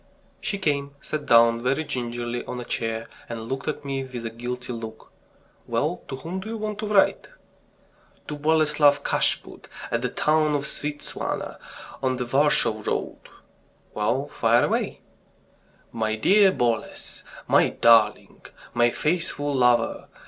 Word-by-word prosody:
She 200 Hz, -, -2 dB
came, 140 Hz, -6 st, -1 dB
sat 150 Hz, +1 st, -5 dB
down 115 Hz, 0 st, +5 dB
very 135 Hz, +5 st, 0 dB
gingerly 120 Hz, -3 st, -3 dB
on 125 Hz, -, -5 dB
a 120 Hz, -, -6 dB
chair, 115 Hz, -1 st, -3 dB, 0.2 s
and 115 Hz, -1 st, -6 dB
looked 135 Hz, +3 st, -4 dB
at 150 Hz, -, -3 dB
me 135 Hz, -1 st, -2 dB
with 125 Hz, -3 st, -7 dB
a 115 Hz, -, -3 dB
guilty 125 Hz, +2 st, -5 dB
look. 110 Hz, -1 st, -8 dB, 0.6 s
"Well, -, -, -1 dB
to -, -, -5 dB
whom 165 Hz, +8 st, -5 dB
do 215 Hz, -, -7 dB
you 225 Hz, -, -4 dB
want 210 Hz, -1 st, -4 dB
to 215 Hz, -, -3 dB
write?" 205 Hz, -2 st, +3 dB, 1.0 s
"To 150 Hz, -, -4 dB
Boleslav 150 Hz, -1 st, +3 dB
Kashput, -, -, -1 dB, 0.2 s
at 115 Hz, -, 0 dB
the 125 Hz, -, -1 dB
town 155 Hz, +2 st, +2 dB
of 140 Hz, -1 st, -1 dB
Svieptziana, 145 Hz, 0 st, -4 dB, 0.4 s
on 130 Hz, -1 st, 0 dB
the 125 Hz, -, -2 dB
Warsaw 120 Hz, -4 st, +2 dB
Road..." -, -, -2 dB, 0.7 s
"Well, -, -, 0 dB
fire -, -, +3 dB
away!" -, -, -1 dB, 0.9 s
"My 110 Hz, -1 st, -1 dB
dear 195 Hz, -, +5 dB
Boles... 120 Hz, -, -2 dB, 0.2 s
my -, -, +4 dB
darling... 110 Hz, -2 st, +3 dB, 0.3 s
my 120 Hz, 0 st, +4 dB
faithful 150 Hz, 0 st, -1 dB
lover. 125 Hz, -3 st, +2 dB
130 Hz, 140 wpm, -25 LUFS, 115-150 Hz, 1.0 s, down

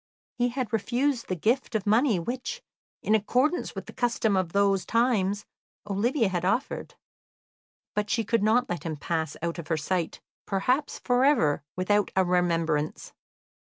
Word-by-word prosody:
He 245 Hz, 0 st, +3 dB
had 245 Hz, -3 st, -4 dB
refused 245 Hz, +4 st, 0 dB
the 185 Hz, -, -1 dB
gift 230 Hz, -, 0 dB
of 215 Hz, -1 st, 0 dB
money 220 Hz, +1 st, +3 dB
which, 255 Hz, -, -4 dB, 0.4 s
in 215 Hz, -, +2 dB
accordance 250 Hz, -, +1 dB
with -, -, -5 dB
the -, -, -11 dB
custom 230 Hz, -4 st, +1 dB
of 185 Hz, -3 st, 0 dB
those 200 Hz, -1 st, +2 dB
times, 210 Hz, -4 st, +1 dB, 0.4 s
Olivia 225 Hz, +5 st, +1 dB
had 180 Hz, -2 st, -2 dB
offered, 230 Hz, +9 st, -1 dB, 1.0 s
but 210 Hz, 0 st, -1 dB
she 230 Hz, -, +1 dB
could 230 Hz, +1 st, +1 dB
not 225 Hz, +4 st, +3 dB
let 175 Hz, -, -3 dB
him 160 Hz, -2 st, -4 dB
pass 160 Hz, 0 st, -2 dB
out 170 Hz, 0 st, -2 dB
of 165 Hz, -, -7 dB
her 165 Hz, -, 0 dB
sight, 170 Hz, +2 st, -2 dB, 0.3 s
perhaps 250 Hz, +9 st, 0 dB
for 250 Hz, 0 st, +1 dB
ever, 210 Hz, -, +3 dB
without 205 Hz, +2 st, +1 dB
a 190 Hz, -1 st, +4 dB
remembrance. 165 Hz, -4 st, 0 dB
205 Hz, 155 wpm, -27 LUFS, 180-245 Hz, 1.0 s, a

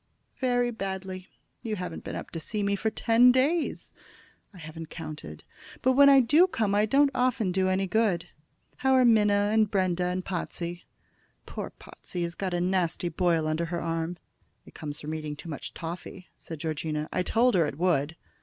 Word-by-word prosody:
"Very 245 Hz, -2 st, +1 dB
badly. 190 Hz, -3 st, -5 dB, 0.3 s
You 220 Hz, -2 st, -3 dB
haven't 180 Hz, -2 st, -6 dB
been -, -, -6 dB
up -, -, -7 dB
to 165 Hz, -, -5 dB
see 210 Hz, +5 st, -3 dB
me 200 Hz, 0 st, +1 dB
for 220 Hz, +2 st, -1 dB
ten 235 Hz, +3 st, +5 dB
days." 290 Hz, +6 st, 0 dB, 0.6 s
"I 200 Hz, -, -15 dB
haven't 160 Hz, -1 st, -9 dB
counted; 155 Hz, -, -8 dB, 0.4 s
but 260 Hz, -, +4 dB
when 280 Hz, +2 st, +7 dB
I 275 Hz, -1 st, +7 dB
do 300 Hz, +10 st, +5 dB
come 215 Hz, -, -1 dB
I 210 Hz, +1 st, +3 dB
don't 275 Hz, +4 st, +4 dB
often 245 Hz, -6 st, +1 dB
do 185 Hz, +1 st, +1 dB
any 190 Hz, +1 st, +1 dB
good. 190 Hz, -4 st, +1 dB, 0.5 s
How 265 Hz, 0 st, +2 dB
are 255 Hz, -1 st, +5 dB
Minna, 210 Hz, -3 st, +4 dB
and 220 Hz, -1 st, +3 dB
Brenda, 185 Hz, -3 st, +1 dB
and 180 Hz, +1 st, -2 dB
Potsey?" 175 Hz, -1 st, -5 dB, 0.6 s
"Poor -, -, -6 dB
Potsey 175 Hz, -1 st, -7 dB
has 170 Hz, 0 st, -3 dB
got 185 Hz, 0 st, -3 dB
a -, -, 0 dB
nasty 180 Hz, -1 st, 0 dB
boil 170 Hz, -1 st, +1 dB
under 155 Hz, +2 st, 0 dB
her 170 Hz, +1 st, -3 dB
arm." 165 Hz, +1 st, -3 dB, 0.5 s
"It -, -, -15 dB
comes 150 Hz, -1 st, -6 dB
from 155 Hz, +1 st, -5 dB
eating 155 Hz, -1 st, -4 dB
too 165 Hz, +3 st, -10 dB
much 150 Hz, -, -6 dB
toffy," 175 Hz, +2 st, -7 dB
said 160 Hz, -3 st, -9 dB
Georgina. 155 Hz, -1 st, -3 dB
"I 185 Hz, -, +1 dB
told 235 Hz, +6 st, +2 dB
her 170 Hz, -4 st, +3 dB
it 140 Hz, -, -6 dB
would." 160 Hz, -3 st, +1 dB
185 Hz, 185 wpm, -27 LUFS, 165-220 Hz, 0.6 s, when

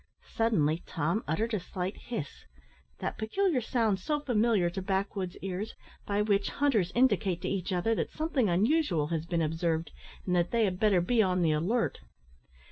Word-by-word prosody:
Suddenly 170 Hz, -9 st, +2 dB
Tom 170 Hz, +7 st, -1 dB
uttered 220 Hz, +10 st, -1 dB
a 210 Hz, -, +1 dB
slight 180 Hz, +1 st, -4 dB
hiss, 220 Hz, -, -6 dB, 0.5 s
that -, -, -4 dB
peculiar 300 Hz, -, +1 dB
sound 220 Hz, -4 st, +1 dB
so 295 Hz, +10 st, -1 dB
familiar 225 Hz, -8 st, +2 dB
to 185 Hz, +3 st, -3 dB
backwoods 190 Hz, -1 st, -2 dB
ears, 195 Hz, +3 st, -4 dB, 0.3 s
by 205 Hz, 0 st, +1 dB
which 200 Hz, -1 st, +1 dB
hunters 225 Hz, -11 st, +1 dB
indicate 220 Hz, -8 st, +2 dB
to -, -, -1 dB
each 190 Hz, -2 st, -2 dB
other 185 Hz, +5 st, +1 dB
that -, -, -1 dB
something 305 Hz, -, 0 dB
unusual 190 Hz, -, +2 dB
has 165 Hz, -1 st, -2 dB
been 170 Hz, -2 st, 0 dB
observed, 160 Hz, +1 st, -1 dB, 0.3 s
and 180 Hz, -, +1 dB
that 175 Hz, 0 st, +2 dB
they 230 Hz, -2 st, +2 dB
had 185 Hz, -2 st, -2 dB
better 205 Hz, -5 st, +4 dB
be 225 Hz, +6 st, +3 dB
on 185 Hz, -3 st, +2 dB
the 160 Hz, -, +3 dB
alert. 185 Hz, +11 st, 0 dB
195 Hz, 170 wpm, -30 LUFS, 175-225 Hz, 0.5 s, better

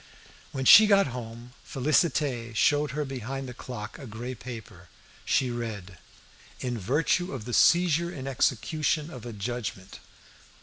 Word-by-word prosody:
When 130 Hz, -1 st, -3 dB
she 215 Hz, +10 st, +10 dB
got 200 Hz, -1 st, +5 dB
home, 120 Hz, 0 st, -8 dB
Félicité 135 Hz, -4 st, 0 dB
showed 145 Hz, +6 st, +3 dB
her 150 Hz, +3 st, -3 dB
behind 135 Hz, 0 st, -5 dB
the 125 Hz, -, -7 dB
clock 120 Hz, 0 st, -8 dB
a 135 Hz, -, -9 dB
grey 120 Hz, +4 st, -6 dB
paper. 110 Hz, -8 st, -10 dB, 0.4 s
She 130 Hz, -2 st, +1 dB
read 105 Hz, -6 st, -6 dB, 0.6 s
"In 125 Hz, -1 st, -3 dB
virtue 150 Hz, -, 0 dB
of 125 Hz, -6 st, -6 dB
the 120 Hz, -, -5 dB
seizure 170 Hz, +3 st, +4 dB
in 135 Hz, -7 st, -7 dB
execution 150 Hz, +4 st, 0 dB
of 125 Hz, -4 st, -9 dB
a -, -, -5 dB
judgment." 105 Hz, -3 st, -5 dB
125 Hz, 140 wpm, -27 LUFS, 115-150 Hz, 0.6 s, she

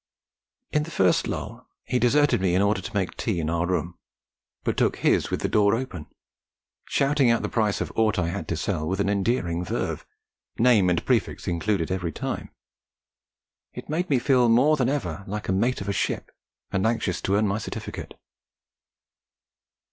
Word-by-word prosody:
In 150 Hz, -, +2 dB
the 155 Hz, -, -5 dB
first 95 Hz, -, +2 dB
lull -, -, -6 dB, 0.2 s
he 125 Hz, -, 0 dB
deserted 145 Hz, -1 st, +3 dB
me 90 Hz, -2 st, +2 dB
in 95 Hz, -, +3 dB
order 100 Hz, -1 st, +1 dB
to -, -, -8 dB
make 95 Hz, -3 st, -1 dB
tea 105 Hz, -7 st, -1 dB
in 80 Hz, 0 st, -1 dB
our 85 Hz, +1 st, 0 dB
room, 85 Hz, -1 st, -2 dB, 0.6 s
but -, -, 0 dB
took -, -, +2 dB
his -, -, +2 dB
with -, -, -2 dB
the -, -, 0 dB
door 105 Hz, 0 st, +3 dB
open, 115 Hz, -, -5 dB, 0.8 s
shouting 140 Hz, -2 st, +2 dB
out 115 Hz, -, +2 dB
the -, -, 0 dB
price 110 Hz, -3 st, 0 dB
of -, -, -3 dB
aught 110 Hz, -1 st, +2 dB
I 85 Hz, -2 st, 0 dB
had 100 Hz, +3 st, -4 dB
to 85 Hz, -, -2 dB
sell 80 Hz, -3 st, -2 dB
with 95 Hz, +3 st, -2 dB
an 100 Hz, -, +1 dB
endearing 100 Hz, -4 st, 0 dB
verve, -, -, -3 dB, 0.5 s
name 115 Hz, -6 st, +4 dB
and 90 Hz, -, 0 dB
prefix -, -, 0 dB
included 90 Hz, 0 st, 0 dB
every 90 Hz, -3 st, -2 dB
time. -, -, -4 dB, 1.2 s
It -, -, -9 dB
made 175 Hz, +4 st, -1 dB
me 140 Hz, -, +4 dB
feel 125 Hz, -1 st, +3 dB
more 130 Hz, +7 st, +5 dB
than 130 Hz, -4 st, +1 dB
ever 95 Hz, -, -3 dB
like 105 Hz, +1 st, -4 dB
the 95 Hz, -, 0 dB
mate 115 Hz, +6 st, +1 dB
of 100 Hz, -, -6 dB
a 100 Hz, -, 0 dB
ship, -, -, -2 dB, 0.4 s
and 95 Hz, +3 st, +1 dB
anxious 110 Hz, -6 st, -1 dB
to 95 Hz, -, +1 dB
earn 105 Hz, +1 st, +3 dB
my 100 Hz, +2 st, -1 dB
certificate. -, -, -7 dB
100 Hz, 185 wpm, -25 LUFS, 90-120 Hz, 1.2 s, more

